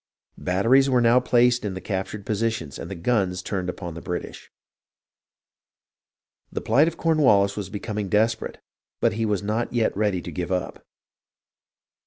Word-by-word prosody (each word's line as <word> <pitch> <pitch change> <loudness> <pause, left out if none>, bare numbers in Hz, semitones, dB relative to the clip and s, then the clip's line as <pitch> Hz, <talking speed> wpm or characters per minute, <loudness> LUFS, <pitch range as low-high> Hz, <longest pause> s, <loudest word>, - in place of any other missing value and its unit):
Batteries 115 +9 +3
were 125 -2 +3
now 120 +1 +5
placed 125 -1 +3
in 100 -3 -3
the - - -4
captured 95 +1 -4
positions 110 - -2
and - - -7
the 95 - -5
guns 95 -1 0
turned 95 -3 -3
upon 90 -1 -6
the 85 - -8
British. 90 - -6 2.0
The - - -3
plight 150 +4 +3
of 170 - -3
Cornwallis 130 -12 +3
was 100 -2 -5
becoming 105 0 -4
desperate, 110 +2 +1 0.4
but - - +2
he 110 +1 -1
was 105 -2 -1
not 110 +3 -1
yet 120 -2 +1
ready 100 -2 +1
to - - -6
give 90 0 -4
up. 90 -1 -3
105 Hz, 155 wpm, -24 LUFS, 95-120 Hz, 2.0 s, now